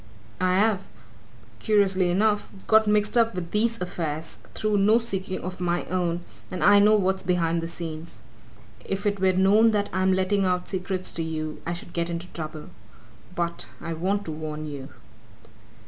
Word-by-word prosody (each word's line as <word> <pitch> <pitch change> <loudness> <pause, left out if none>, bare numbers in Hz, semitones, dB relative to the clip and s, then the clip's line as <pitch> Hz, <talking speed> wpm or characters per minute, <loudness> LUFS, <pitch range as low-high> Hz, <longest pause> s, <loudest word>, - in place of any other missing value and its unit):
I've 190 +2 +3 0.8
curiously 195 -4 +2
enough 210 +3 +1 0.2
got 220 0 +5
mixed 210 +1 +2
up 230 -4 +2
with 170 -2 -5
these 230 +2 +1
affairs, 165 -3 -4 0.2
through 215 -1 +1
no 210 +3 +5
seeking 195 -5 -2
of 185 +1 -6
my 175 0 0
own, 175 -2 0 0.3
and 185 - -3
I 205 0 +7
know 210 +1 +6
what's 190 -2 +1
behind 170 -2 +1
the 165 - -4
scenes. 165 -1 -6 0.7
If 195 +1 -3
it 205 -1 +1
were 190 0 +3
known 200 +5 +5
that 205 -1 0
I'm 190 +1 +2
letting 190 +2 +1
out 180 -1 0
secrets 185 -1 -3
to 165 - -4
you, 155 -1 -4
I 170 - -1
should 175 0 -8
get 170 0 -1
into 170 +1 -4
trouble. 155 -2 -7 0.6
But, 170 -1 -2
I 165 0 -4
want 195 +5 -1
to 160 - -4
warn 155 0 -5
you!" 140 -2 -7
185 Hz, 165 wpm, -25 LUFS, 170-205 Hz, 0.8 s, I